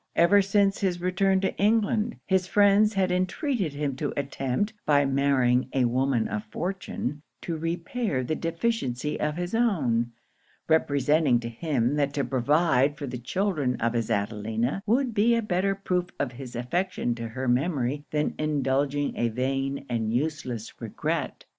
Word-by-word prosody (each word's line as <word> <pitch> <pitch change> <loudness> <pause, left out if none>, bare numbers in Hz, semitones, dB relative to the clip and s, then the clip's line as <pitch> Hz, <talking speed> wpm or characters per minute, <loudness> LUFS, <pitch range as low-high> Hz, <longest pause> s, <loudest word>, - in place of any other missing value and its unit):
Ever 200 +4 +5
since 195 0 +2
his 180 -3 0
return 190 +2 +2
to 190 - -1
England, 215 +1 +2
his 190 -2 +1
friends 205 +2 +4
had 190 -2 +2
entreated 185 - -1
him 145 -2 -2
to 145 0 -2
attempt, 140 - -1
by 145 -1 +3
marrying 135 -2 +2
a 130 -2 +2
woman 125 -1 +1
of 105 0 -3
fortune, 155 - -4 0.2
to 170 - -3
repair 170 - -2
the 140 - -2
deficiency 165 - -2
of 150 +1 -1
his 175 +2 -3
own; 135 - +1 0.6
representing 145 -3 +3
to 115 - -4
him, 130 0 0
that 140 -1 +1
to 140 - +1
provide 145 +1 +2
for 145 - -5
the 125 -2 -5
children 145 - -1
of 115 0 -1
his 115 -2 -1
Adelina, 110 - -1
would 245 +2 +2
be 225 +3 +3
a 230 - +1
better 195 0 0
proof 180 -2 -1
of 140 - -1
his 125 0 -9
affection 125 +2 -1
to 115 0 -5
her 130 +3 -4
memory 135 +1 0
than 150 0 0
indulging 145 -1 0
a 120 - +1
vain 135 +4 -2
and 115 -3 -1
useless 125 -4 -3
regret. - - -3
145 Hz, 155 wpm, -26 LUFS, 125-185 Hz, 0.6 s, Ever